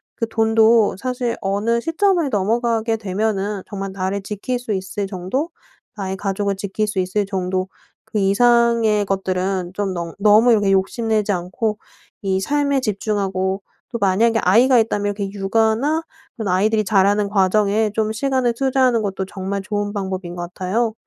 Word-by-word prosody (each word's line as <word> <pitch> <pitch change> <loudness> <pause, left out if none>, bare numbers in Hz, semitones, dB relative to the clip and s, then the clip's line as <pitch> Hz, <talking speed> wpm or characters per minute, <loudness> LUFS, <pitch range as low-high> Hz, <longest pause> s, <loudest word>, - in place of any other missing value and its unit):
그 230 - -2
돈도 225 0 +3
사실 250 +1 -2
어느 210 +4 0
시점을 335 +1 +1
넘어가게 225 +1 0
되면은 205 -1 -2
정말 195 -1 -5
나를 195 +1 -2
지킬 210 +5 -3
수 240 -3 -3
있을 190 +1 -3
정도 195 - -3 0.5
나의 190 -1 -3
가족을 200 +1 -1
지킬 200 +2 -2
수 205 -2 -2
있을 185 +3 0
정도 185 -1 -2 0.4
그 - - -5
이상의 230 +1 +3
것들은 190 -1 -1
좀 200 -2 -1
너 170 -2 -5
너무 215 +4 +5
이렇게 205 -3 +3
욕심내지 215 +2 +1
않고 195 +4 -2 0.5
이 190 -1 0
삶에 280 +2 +1
집중하고 195 -3 -1 0.3
또 235 - -4
만약에 225 +4 +3
아이가 240 +7 +5
있다면 215 -2 0
이렇게 200 -2 -2
육아나 225 +10 +1 0.3
그런 220 -3 -3
아이들이 215 +4 +2
자라는 200 0 +2
과정에 205 +2 +2
좀 220 -1 0
시간을 260 0 0
투자하는 255 -2 +2
것도 195 -1 -2
정말 195 +1 -4
좋은 205 0 -3
방법인 190 -3 -4
것 175 0 -6
같아요. 220 +5 -1
205 Hz, 330 characters per minute, -20 LUFS, 195-230 Hz, 0.5 s, 너무